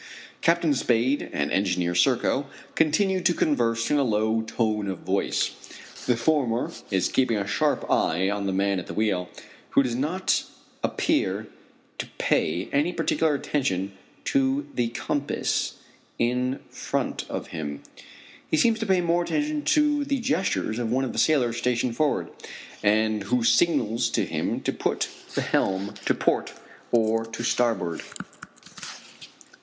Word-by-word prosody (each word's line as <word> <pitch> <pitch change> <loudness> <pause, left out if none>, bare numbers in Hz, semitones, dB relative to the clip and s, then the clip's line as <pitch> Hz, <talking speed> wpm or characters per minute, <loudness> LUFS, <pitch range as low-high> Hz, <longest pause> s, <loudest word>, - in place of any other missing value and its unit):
Captain 170 -2 +3
Spade 130 +1 +1
and 70 - -1
Engineer 90 -3 +1
Serko 125 +8 +2 0.3
continue 185 +4 +2
to 175 -1 +2
converse 115 -5 +1
in 150 - +4
a - - +3
low 110 -1 +1
tone 110 -2 -1
of 95 - -5
voice. - - 0 0.6
The 125 -2 +3
former 125 -2 +1 0.2
is 95 -3 +2
keeping 125 -4 +1
a 100 - -1
sharp 100 - 0
eye 90 +4 +2
on 100 0 -1
the - - 0
man 100 0 +1
at 90 - -8
the - - -6
wheel, 95 -5 0 0.4
who 140 - +4
does 125 -3 -2
not 155 +10 0 0.4
appear - - 0 0.5
to - - -3
pay 85 +4 +1
any 145 +5 +2
particular 160 -2 +1
attention 100 -10 -1 0.3
to 275 +1 +1
the 120 -1 +1
compass 140 +4 -1 0.4
in 125 +2 0
front - - -2
of - - -5
him. 75 -3 -5 0.7
He 155 - +2
seems 225 +7 +3
to 220 - -2
pay 190 -2 +3
more 170 0 +2
heed 300 - -1
to 295 -1 +3
the 280 -1 -1
gestures 165 - 0
of 115 -2 -2
one 130 +2 +1
of 125 - -4
the - - -2
sailors 125 -7 +3
stationed 125 -1 0
forward, 150 +1 0 0.5
and 110 0 +2
who 120 +3 +1
signals 115 -2 +3
to - - 0
him - - -2
to - - -1
put - - -1 0.3
the - - +1
helm 95 +2 0
to - - +3
port - - 0 0.4
or 115 -1 +2
to 115 +1 -6
starboard. 115 -9 0
120 Hz, 150 wpm, -25 LUFS, 105-155 Hz, 0.7 s, in